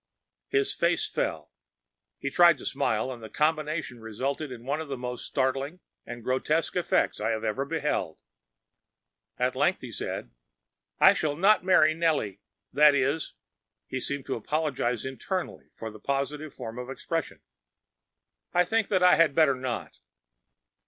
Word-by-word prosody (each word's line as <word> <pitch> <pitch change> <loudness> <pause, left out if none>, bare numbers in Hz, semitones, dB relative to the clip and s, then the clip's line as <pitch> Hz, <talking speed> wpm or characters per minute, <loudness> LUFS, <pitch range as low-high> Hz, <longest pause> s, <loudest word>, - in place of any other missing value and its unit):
‚ÄĚ 410 - +2
His 410 0 +1
face 430 - +1
fell. - - -3 0.7
He - - -4
tried 170 -3 +6
to - - -10
smile, 110 +4 0
and 120 -2 -8
the 110 - -8
combination 155 -4 -1
resulted 135 +6 -3
in 120 -1 -9
one 145 +4 -1
of 160 - -6
the 135 -1 -4
most 125 0 -5
startling 135 +5 -1 0.3
and 120 -1 -7
grotesque 140 +6 0
effects 180 -10 +1
I 110 +2 +1
ever 110 +4 -2
beheld. 150 - -2 1.1
At - - 0
length - - +2
he - - -7
said,‚ÄĒ - - -5 0.7
“I - - +8
shall 150 -2 -1
not 195 +6 +4
marry 155 -4 +5
Nellie,‚ÄĒthat 150 - +1 0.2
is,‚ÄĚ‚ÄĒhe 115 -5 -9
seemed 140 0 -3
to - - -2
apologize 125 -2 -1
internally 175 +8 -4
for 110 -1 -7
the 110 - -12
positive 140 +4 -2
form 115 0 -7
of 125 +1 -6
expression,‚ÄĒ‚ÄúI 160 - -5
think 225 0 +1
that 185 -3 +2
I 180 - +7
had 165 -4 +4
better 155 -4 +5
not. 130 -3 -5
140 Hz, 145 wpm, -27 LUFS, 120-160 Hz, 1.1 s, I